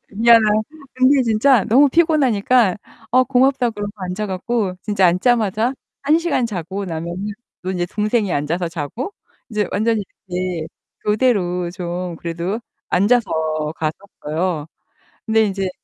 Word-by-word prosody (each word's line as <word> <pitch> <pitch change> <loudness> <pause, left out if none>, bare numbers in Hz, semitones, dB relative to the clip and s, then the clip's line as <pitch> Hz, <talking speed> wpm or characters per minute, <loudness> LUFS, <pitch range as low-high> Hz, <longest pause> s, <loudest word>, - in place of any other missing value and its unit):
미안하긴 225 0 +5 0.2
한데 315 -3 -16
근데 260 +1 +4
진짜 230 0 +3
너무 275 +6 +5
피곤하니까 255 - +3 0.3
"아, 255 +2 +5
고맙다." 255 -1 +2
그러고 205 -1 -5
앉아 190 +2 -4
가지고 195 0 -2
진짜 205 -3 +2
앉자마자 220 +5 +2 0.3
한 300 +4 +4
시간 320 -8 0
자고 195 0 -4
나면은 170 +4 -4 0.3
또 185 - -3
인제 175 -2 -1
동생이 210 -2 0
앉아서 165 +4 -1
자고 165 - -5 0.4
이제 210 -2 0
완전히 220 +1 +1 0.3
이렇게 180 -2 -3 0.4
교대로 195 -6 +1
좀 180 -1 -4
그래도 170 +7 -3 0.3
앉아서 220 +4 +2 0.5
갔었어요. 160 -1 -3 0.6
근데 220 -1 +3
인제 195 -1 -2
205 Hz, 305 characters per minute, -20 LUFS, 180-240 Hz, 0.6 s, 미안하긴